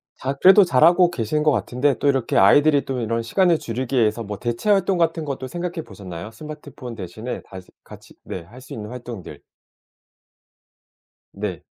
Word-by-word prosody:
자 135 +1 -3
그래도 190 +8 +7
잘하고 175 +3 +5
계신 140 +2 -1
것 155 - +4
같은데 125 +3 0
또 145 - 0
이렇게 135 -4 +1
아이들이 145 +8 +5
또 130 -2 -3
이런 115 0 -1
시간을 170 - +2
줄이기 125 +3 -4
위해서 115 -1 +2
뭐 105 -1 -6
대체 120 - -2
활동 195 -2 +3
같은 165 -1 0
것도 135 -2 -4
생각해 175 +1 -5
보셨나요? 95 0 -9
스마트폰 145 -2 -9
대신에 110 +5 -6
다시 95 -1 -11
같이 - - -14
네 90 - -6
할 120 +9 -14
수 135 - -11
있는 105 -1 -7
활동들. 120 -5 -9 1.9
네. 100 -3 -5
125 Hz, 350 characters per minute, -22 LUFS, 110-155 Hz, 1.9 s, 그래도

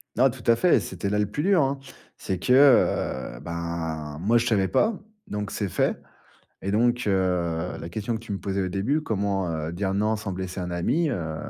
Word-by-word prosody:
Non, 130 +3 +5
tout 125 -1 -9
à 115 - +5
fait, 175 +9 +4
c'était 100 - -4
là 105 - 0
le 105 - +2
plus 105 +9 -4
dur, 185 -2 +4
hein. 135 +1 -1 0.4
C'est 95 - -3
que, 110 +7 +1
heu, 120 - +4
ben, 80 -1 -4
moi 115 +6 +3
je 120 - +1
savais 105 -5 +2
pas, 210 - +2 0.3
donc 105 -1 -4
c'est 100 -1 -3
fait. - - 0 0.6
Et 100 - -2
donc, 120 +3 +2
heu, 90 -3 0
la 85 - -7
question 110 +5 -3
que - - -4
tu 115 -2 -9
me 100 - -2
posais 100 0 -2
au 95 - -1
début, 110 +12 0
comment, 100 - -1
heu, 80 0 -3
dire 95 +2 -1
non 105 +2 +1
sans 105 -2 -5
blesser 95 0 -4
un 90 0 -4
ami? 145 - +1
Heu, 80 - -3
100 Hz, 215 wpm, -25 LUFS, 90-115 Hz, 0.6 s, Non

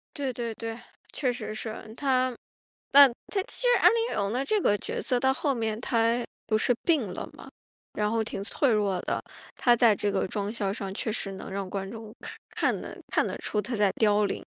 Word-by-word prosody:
对 275 -3 -1
对 235 -1 -3
对， 225 +1 -5 0.4
确 260 -4 0
实 240 -3 -5
是。 220 0 -6
她 255 -2 +1 0.6
但 280 -1 +10 0.2
她 395 - 0
其 - - -7
实 - - +2
安 - - +8
陵 465 0 0
容 200 -1 0
的 250 +4 0
这 425 +9 +2
个 205 - +3
角 - - -4
色 250 -3 0
到 265 +1 +3
后 280 +1 0
面， 225 -3 -2
她 230 0 +1 0.2
不 215 0 +2
是 245 - +3
病 270 - +1
了 - - -6
嘛， - - -12 0.4
然 210 0 0
后 225 0 +1
挺 205 - -5
脆 250 +5 +1
弱 200 -4 +1
的， - - -2 0.3
她 240 -1 +4
在 230 -2 +5
这 205 0 -1
个 195 -1 0
妆 205 +1 -2
效 205 -4 -2
上 195 -2 -4
确 220 +2 -2
实 200 -2 -2
能 190 - -8
让 195 -1 -3
观 195 0 -4
众 220 -1 -9 0.4
看 - - 0
得 - - -8
看 - - +2
得 - - -4
出 210 - -1
她 235 +4 -4
在 205 -2 +3
凋 210 -1 +4
零。 200 - -3
225 Hz, 230 characters per minute, -27 LUFS, 205-250 Hz, 0.6 s, 但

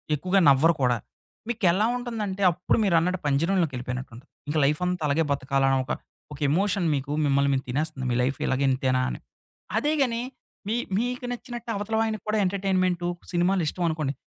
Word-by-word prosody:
ఎక్కువగా 185 +6 +1
నవ్వరు 145 +5 +5
కూడా. 125 -2 +3 0.5
మీకెలా 210 -4 +2
ఉంటుందంటే, 215 -5 -4
అప్పుడు 180 +2 0
మీరన్నట్టు 180 -1 +2
పంజరంలోకెళ్ళిపోయినట్టు 140 -5 0
ఉంటది. 125 - -15 0.2
ఇంక 150 +2 -1
లైఫంత, 180 +5 0
అలాగే 145 +3 +2
బతకాలన్న 135 -1 +1
ఒక, - - -5 0.4
ఒక 145 - -10
ఎమోషన్ 190 +3 +1
మీకు 140 +1 -4
మిమ్మల్ని 140 0 +2
మిం 135 - +1
తినేస్తుంది 145 0 -2
మీ - - +1
లైఫిలాగే 130 +1 0
ఇంతేనా 130 0 +1
అని. - - -5 0.6
అదేగాని, 275 -6 +1 0.5
మీ 220 - 0 0.2
మీకు 245 +2 -2
నచ్చినట్టే 240 -1 -7
అవతలవాయనకి 220 +1 -1
కూడా 215 0 +1
ఎంటర్టైన్మెంటు, 185 -2 0 0.2
సినిమాలిష్టం 175 -1 +1
అనుకోండి. 155 -4 -2
175 Hz, 140 wpm, -26 LUFS, 140-205 Hz, 0.6 s, నవ్వరు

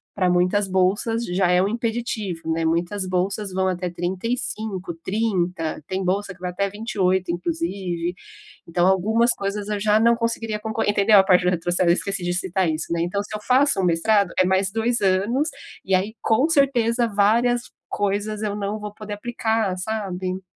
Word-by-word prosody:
pra 185 -2 +2
muitas 180 +3 +2
bolsas, 200 +5 +1
já 180 0 +1
é 180 0 +4
um 195 - +2
impeditivo, 220 -7 -3
né, 165 0 0
muitas 175 +4 0
bolsas, 190 +2 -1
vão 190 0 +1
até 180 -1 -2
35, 190 +1 -3
30, 180 -7 -1
tem 190 0 -2
bolsa, 195 +1 -1
que 185 - -22
vai 180 0 -3
até 200 +2 -1
28 190 -4 0
inclusive, 180 - -3 0.5
então 175 +2 +2
algumas 220 +6 +3
coisas 200 +1 -3
eu 210 - -1
já 210 +1 +3
não 235 +1 +4
conseguiria, 230 -2 -2
conco 220 +1 -3
entendeu 205 0 +5
a - - +6
parte 180 -1 +4
do 180 - +2
retrocesso, 175 0 +1
esqueci 195 +1 -1
de 175 0 -1
citar 185 0 0
isso, 155 +2 -2
né, 165 - 0
então 200 +4 -1
se 215 - -7
eu 210 - -6
faço 260 -3 +3
um - - +1
mestrado, 195 +3 +2
é 185 - +5
mais 190 +1 +1
2 225 +2 0
anos, 205 +11 +1 0.4
e 190 - -1
aí 205 +5 -1
com 245 +7 +3
certeza, 245 -5 +2
várias 235 +4 +2 0.2
coisas 205 +1 -1
eu 205 -1 -2
não 210 +1 -3
vou 210 0 -7
poder 210 -1 -7
aplicar 220 -3 -1
sabe. 185 -2 -3
200 Hz, 180 wpm, -23 LUFS, 180-220 Hz, 0.5 s, a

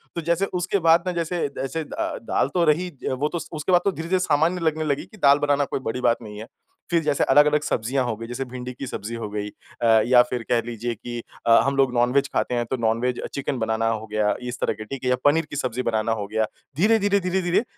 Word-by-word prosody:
तो 170 - -2
जैसे 185 +3 +2 0.2
उसके 200 +3 0
बाद 165 +1 +6
ना - - +1
जैसे 170 -1 -1
जैसे 160 +4 -3
द 150 - -16 0.4
दाल - - +2
तो 175 - +2
रही 165 +4 +2 0.2
वो 130 +3 0
तो 170 - -3
स - - -8
उसके 155 +4 -2
बाद 175 -1 +5
तो 200 - +3
धीरे-धीरे 175 +1 -1
सामान्य 165 +1 +1
लगने 160 -1 0
लगी 145 -2 -1
कि 215 - -17
दाल 140 -5 +5
बनाना 145 -1 +2
कोई - - -3
बड़ी 125 +3 -3
बात 115 - +3
नहीं 105 -2 -9
है। 110 - -8 0.4
फ़िर 170 -1 +3
जैसे 145 -2 +1
अलग, 145 +2 +6
अलग 150 0 +2
सब्जियाँ 130 -2 -1
हो 120 - -2
गई 115 +1 -7
जैसे 125 +3 -4
भिंडी 125 0 -6
की 130 +2 -7
सब्ज़ी 115 0 -5
हो 115 -2 -5
गई 105 0 -4 0.3
अ, - - +1 0.2
या 125 0 +6
फ़िर 125 -2 -3
कह 120 -1 +3
लीजिए 120 0 -3
कि 120 +2 -6 0.3
अ, - - +5
हम 140 0 0
लोग 135 -2 +3
नॉन 120 0 +2
वेज 140 0 +3
खाते 125 - 0
हैं 120 0 0
तो 130 - -3
नॉन 115 -1 +1
वेज 125 0 -1
चिकन 140 -1 -2
बनाना 110 0 0
हो 110 -1 -2
गया 105 -1 +1
इस 125 0 -5
तरह - - +1
के 110 +1 -8
ठीक 135 +4 -7
है 125 - 0
या 125 - +4
पनीर 155 +3 +3
की - - -7
सब्ज़ी 125 -3 -2
बनाना 110 -1 0
हो 105 -3 -2
गया। 110 +1 0 0.3
धीरे, 220 +6 +4
धीरे, 200 0 +2
धीरे, 185 0 -1
धीरे 175 +4 +1
135 Hz, 265 wpm, -23 LUFS, 115-165 Hz, 0.4 s, बाद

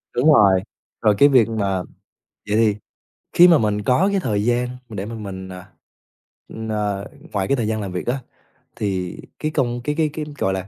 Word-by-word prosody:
Đúng 150 +5 +5
rồi. 95 -6 +5 0.4
Rồi 105 -2 +4
cái 145 - +6
việc 120 -5 +4
mà 100 -4 -1 0.7
vậy 105 - +2
thì 110 -2 +3 0.6
khi 175 +1 +8
mà 170 -3 +6
mình 105 -3 0
có 165 - +3
cái 195 - +1
thời 105 - -1
gian 120 +1 +1 0.2
mình 110 - -8
để 95 - -3
mà 115 - -6
mình, 95 -3 -7
à 90 0 -10 1.0
ờ, 105 -2 -2 0.3
ngoài 95 -2 0
cái 140 - +2
thời 110 -3 -1
gian 110 -1 -1
làm 95 -2 -5
việc 90 +4 -5
á, 130 +3 0 0.6
thì 95 -4 -3 0.2
cái 155 - -2
công 120 -5 -1
cái 150 +2 -1
cái 155 -2 +1
cái, 155 -1 -4
gọi 95 - +1
là, 95 0 -4
110 Hz, 200 wpm, -21 LUFS, 100-130 Hz, 1.0 s, khi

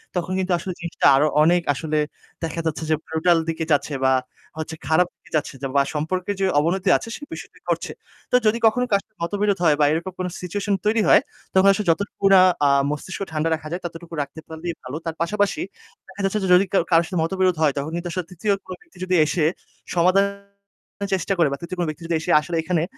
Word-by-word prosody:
তখন 180 0 -2
কিন্তু 190 0 -1
আসলে 185 +2 -5
জিনিসটা 170 -1 -3
আরও 145 +3 +4 0.2
অনেক 175 +2 +4
আসলে 155 +2 -2 0.5
দেখা 165 0 -3
যাচ্ছে 160 0 -2
যে 155 - +4
ব্রুটাল 165 +2 +2
দিকে 165 0 -2
যাচ্ছে 145 0 +1
বা 130 - +4 0.5
হচ্ছে 160 0 -5
খারাপ 165 +3 +3
দিকে - - -23
যাচ্ছে 150 -1 -1 0.2
বা 140 - +6
সম্পর্কের 180 +6 -2
যে - - +3
অবনতি 180 +5 +1
আছে - - -8
সে - - -11
বিষয়টি - - -10
ঘটছে। - - -1 0.4
তো - - +3
যদি 215 +2 +3
কখনো 250 +3 +2
কারো 200 -1 +2 0.2
মতবিরোধ 200 +2 0
হয় 155 -3 +5
বা 150 - +5
এরকম 170 +4 -2
কোন 185 - -1
সিচুয়েশন 200 +3 -2
তৈরি 220 +1 +3
হয়। - - +7 0.3
তখন 190 +1 +5
আসলে 200 0 -3
যতটুকু 200 +4 -4
না 190 - +8 0.3
আ - - +4 0.2
মস্তিষ্ক 165 +6 -5
ঠান্ডা 155 +1 0
রাখা 155 -1 -9
যায় 175 +2 -3
ততটুকু 170 0 -8
রাখতে 140 +2 -7
পারলে 160 +1 -8 0.2
ভালো। 130 +2 -6
তার 165 -1 -3
পাশাপাশি 205 - 0 0.5
দেখা 190 +1 -8
যাচ্ছে 195 +2 +1
যে, - - 0
যদি 180 +2 +6
কা - - +4
কারো 165 0 +5
সাথে 180 0 -3
মতবিরোধ 185 +1 +1
হয় 150 -3 +3
তখন 140 +3 -3
কিন্তু 175 +1 -4
আসলে 180 0 -3
৩য় 190 +4 -2 0.2
কোন 185 - -5
ব্যক্তি 345 -2 -22
যদি 185 0 +1
এসে 155 +1 0 0.5
সমাধানের 200 +3 +2 0.7
চেষ্টা 190 +1 -1
করে 170 - +4
বা 140 - -2
৩য় 175 +2 -6
কোন 175 - +1
ব্যক্তি 155 +2 -7
যদি 170 - 0
এসে 170 +2 -2
আসলে 170 +2 -5
এখানে 170 -1 0
175 Hz, 210 wpm, -22 LUFS, 160-190 Hz, 0.7 s, না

